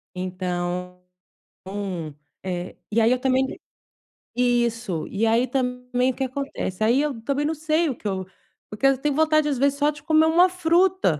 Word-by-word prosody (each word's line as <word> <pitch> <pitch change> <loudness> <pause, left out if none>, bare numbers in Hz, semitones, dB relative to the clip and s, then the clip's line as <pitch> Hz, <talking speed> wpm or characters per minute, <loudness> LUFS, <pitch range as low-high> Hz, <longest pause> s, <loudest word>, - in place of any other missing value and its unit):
Então, 180 0 -3 1.5
um, 190 - -3
é 175 0 -4 0.2
e 230 +2 +3
aí 225 +2 +4
eu 255 - +2
também 260 0 +2 0.9
isso, 240 -7 0
e 210 +3 0
aí 230 +3 +3
também 250 0 -1
o - - -10
que 270 - -2
acontece? 255 -7 -3
Aí 240 +5 +4
eu 290 -6 -2
também 280 +4 -1
não 310 - 0
sei 315 +1 0
o 260 - -3
que 215 - -7
eu 190 -1 -2 0.4
porque 210 +6 -3
eu 270 0 +5
tenho 290 0 0
vontade 310 -1 +3
às 275 - -1
vezes 280 +2 +1
só 295 0 +3
de 295 0 -7
comer 315 -1 +4
uma 345 +3 +5
fruta, 360 - +2
255 Hz, 175 wpm, -24 LUFS, 215-295 Hz, 1.5 s, eu